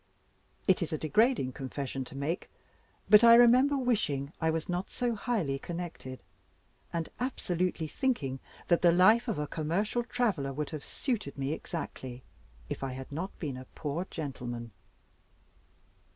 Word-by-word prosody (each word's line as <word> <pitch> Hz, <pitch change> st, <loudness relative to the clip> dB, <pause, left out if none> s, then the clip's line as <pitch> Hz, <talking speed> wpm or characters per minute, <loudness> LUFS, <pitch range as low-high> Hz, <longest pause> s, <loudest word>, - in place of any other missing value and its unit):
It 190 Hz, -2 st, +4 dB
is 170 Hz, -, -2 dB
a 155 Hz, -, 0 dB
degrading 160 Hz, -, +2 dB
confession 135 Hz, +1 st, -4 dB
to 135 Hz, -, -11 dB
make; 155 Hz, +6 st, -2 dB, 0.6 s
but 210 Hz, +1 st, +8 dB
I 230 Hz, 0 st, +10 dB
remember 250 Hz, +4 st, +6 dB
wishing 170 Hz, -, 0 dB
I 160 Hz, -, +3 dB
was 160 Hz, 0 st, -1 dB
not 180 Hz, +1 st, -2 dB
so 245 Hz, -1 st, -1 dB
highly 200 Hz, -, -1 dB
connected, 165 Hz, -6 st, -6 dB, 0.7 s
and 165 Hz, -1 st, -2 dB
absolutely 180 Hz, -9 st, -1 dB
thinking 145 Hz, -, -1 dB, 0.3 s
that 170 Hz, -, +3 dB
the 175 Hz, -, +6 dB
life 215 Hz, +8 st, +5 dB
of 225 Hz, -, -1 dB
a 150 Hz, -, -1 dB
commercial 170 Hz, +11 st, -1 dB
traveler 200 Hz, -, 0 dB
would 150 Hz, +1 st, -3 dB
have 155 Hz, -3 st, -5 dB
suited 225 Hz, -, -3 dB
me 135 Hz, +2 st, -1 dB
exactly, 130 Hz, -7 st, -6 dB, 0.4 s
if -, -, -5 dB
I 135 Hz, -1 st, -2 dB
had 130 Hz, +1 st, -8 dB
not 170 Hz, +7 st, -4 dB
been 140 Hz, -6 st, -4 dB
a 130 Hz, -, -8 dB
poor 160 Hz, +4 st, -3 dB
gentleman. 120 Hz, -6 st, -5 dB
165 Hz, 150 wpm, -30 LUFS, 140-215 Hz, 0.7 s, I